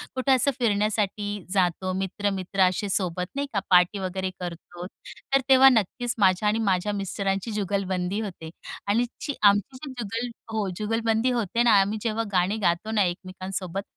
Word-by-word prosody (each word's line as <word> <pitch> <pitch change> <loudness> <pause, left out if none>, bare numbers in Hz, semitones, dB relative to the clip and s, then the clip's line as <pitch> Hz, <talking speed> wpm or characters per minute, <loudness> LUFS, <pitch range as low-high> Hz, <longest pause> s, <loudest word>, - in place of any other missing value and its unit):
कुठे 260 +1 +1
असं 265 +2 +4
फिरण्यासाठी 205 -2 0
जातो, 185 -1 +1
मित्र-मित्र 195 0 -2
असे 185 +3 -2
सोबत 180 -2 -1
नाही 280 0 -1
का, 200 - +2
पार्टी 180 +2 +4
वगैरे 190 0 -3
करतो, 175 0 -7 0.5
तर 275 - +4
तेव्हा 265 0 +8
नक्कीच 240 +1 0
माझी 190 0 +3
आणि 210 +2 +2
माझ्या 185 +3 0
मिस्टरांची 195 +1 -2
जुगलबंदी 195 -2 -1
होते. 175 -6 -7 0.4
आणि 230 +4 +2 0.2
ची 290 - -3
आमची 205 +6 +3
जी 285 - -6
जुगल 230 +3 -3 0.2
हो. 215 -2 -1
जुगलबंदी 225 +2 0
होते 235 -1 0
ना, 220 -4 +6
आम्ही 205 +3 -1
जेव्हा 225 0 -1
गाणी 185 +3 +1
गातो 175 +6 -1
ना, 215 -2 +3
एकमेकांसोबत, 185 +1 -4
200 Hz, 155 wpm, -25 LUFS, 185-225 Hz, 0.5 s, तेव्हा